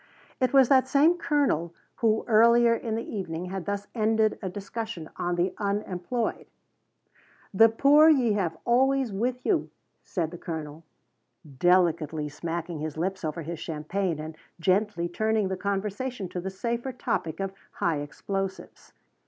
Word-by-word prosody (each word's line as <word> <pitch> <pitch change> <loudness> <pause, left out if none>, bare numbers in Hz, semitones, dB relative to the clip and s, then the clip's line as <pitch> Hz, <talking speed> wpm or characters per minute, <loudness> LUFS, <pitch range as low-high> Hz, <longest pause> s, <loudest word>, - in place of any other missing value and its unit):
It 255 -2 +2
was 270 -2 +6
that 260 -1 +4
same 295 +6 +4
colonel 220 - 0 0.2
who, 220 -1 +1
earlier 235 +1 +5
in 230 -1 -2
the 230 - -4
evening, 180 -5 -4
had 190 -2 -4
thus 200 0 -3
ended 220 -1 +1
a 190 - -3
discussion 200 -2 -6
on 175 0 -1
the 175 +2 0
unemployed. 205 +2 -2 1.1
"The 225 +4 +7
poor 290 +7 +6
ye 255 -8 +4
have 175 -6 -1
always 260 -1 +2
with 245 +5 -2
you," 370 -6 +1 0.3
said 165 -4 -2
the 175 - -9
Colonel, 160 -1 -6 0.8
delicately 165 -4 +2
smacking 165 +2 -4
his 155 0 -5
lips 190 +3 -2
over 160 +1 -3
his 165 +1 -6
champagne 165 +3 -2
and 155 +1 -7 0.2
gently 185 0 +1
turning 215 +2 0
the 190 - -1
conversation 200 +3 -3
to 180 - -4
the 190 - -4
safer 235 +6 -3
topic 165 -9 -2
of 195 0 -3 0.2
high 165 -3 0
explosives. 190 +6 -5
195 Hz, 145 wpm, -27 LUFS, 170-230 Hz, 1.1 s, The